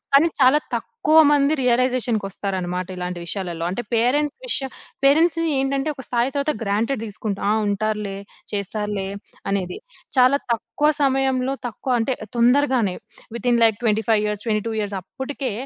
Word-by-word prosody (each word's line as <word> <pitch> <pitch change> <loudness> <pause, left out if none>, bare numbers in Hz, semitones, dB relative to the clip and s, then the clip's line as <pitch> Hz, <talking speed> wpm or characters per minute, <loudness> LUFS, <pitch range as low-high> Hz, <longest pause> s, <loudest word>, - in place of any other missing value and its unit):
కానీ, 285 +4 +6
చాలా 265 +3 +6 0.2
తక్కువ 320 -9 +1
మంది 285 0 +3
రియలైజేషన్‌ 250 -1 +2
కోస్తారనమాట 185 -2 -3
ఇలాంటి 180 0 -4
విషయాలలో. 175 -3 -3
అంటే 195 +6 -3
పేరెంట్స్ 280 +6 +1
విష - - +1 0.5
పేరెంట్స్‌ని 330 +3 +4
ఏంటంటే 270 +2 0
ఒక 265 - -9
స్థాయి 245 +1 +1
తర్వాత 285 +2 +1
గ్రాంటెడ్ 220 +4 0
దీసుకుంటాం. 210 -1 -4
ఆ! - - +3
ఉంటారులే, 210 -1 -2 0.4
చేస్తారులే 205 -1 -2 0.4
అనేది. 190 -2 -2 0.4
చాలా 255 +2 +6
తక్కువ 295 +6 0
సమయంలో 270 -1 +1
తక్కువ 255 +3 -4
అంటే 255 +3 0 0.2
తొందరగానే 245 -4 +3 0.4
వితిన్ 240 -1 +1
లైక్ 220 -2 +3
25 220 -1 +2
ఇయర్స్ 210 -1 -3
22 220 0 -1
ఇయర్స్ 205 -1 -3
అప్పటికే 265 +5 -5
235 Hz, 135 wpm, -22 LUFS, 205-270 Hz, 0.5 s, కానీ